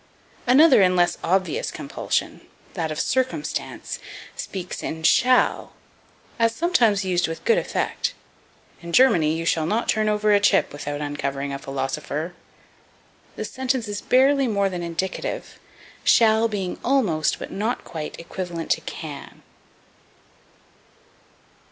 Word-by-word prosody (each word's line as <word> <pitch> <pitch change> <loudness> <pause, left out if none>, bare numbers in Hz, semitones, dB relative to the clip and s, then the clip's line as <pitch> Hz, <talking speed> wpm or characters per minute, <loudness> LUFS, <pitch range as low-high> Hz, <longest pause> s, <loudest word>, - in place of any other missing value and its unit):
Another 270 -1 +7
and 185 -1 +4
less 175 0 +2
obvious 190 - 0
compulsion - - -3 0.3
that 165 -4 -2
of 155 - -4
circumstance 260 - -2 0.4
speaks 185 -2 -6
in 160 0 -5
shall, 250 +9 +3 0.7
as 230 0 +2
sometimes 230 - +2
used 180 -1 +1
with 165 0 -7
good 470 +1 +4
effect: - - -2 0.7
In 170 0 -8
Germany 165 -12 +5
you 165 0 -3
shall 160 -2 +1
not 220 +6 0
turn 215 0 +2
over 210 0 +2
a 205 - +5
chip 200 - +3
without 145 0 -5
uncovering 140 -1 -3
a 140 - -4
philosopher. 140 +4 -4 1.0
The - - -4
sentence 260 -3 -2
is 205 0 -4
barely 270 +1 +3
more 200 -3 +1
than 180 -1 -4
indicative, 170 +2 -4 0.4
shall 220 0 +5
being 195 -4 -4
almost, 210 - +1
but - - -8
not 220 +5 -2
quite, 155 -2 -7
equivalent 170 -1 -5
to - - +2
can. 145 -4 -8
190 Hz, 125 wpm, -23 LUFS, 165-230 Hz, 1.0 s, Another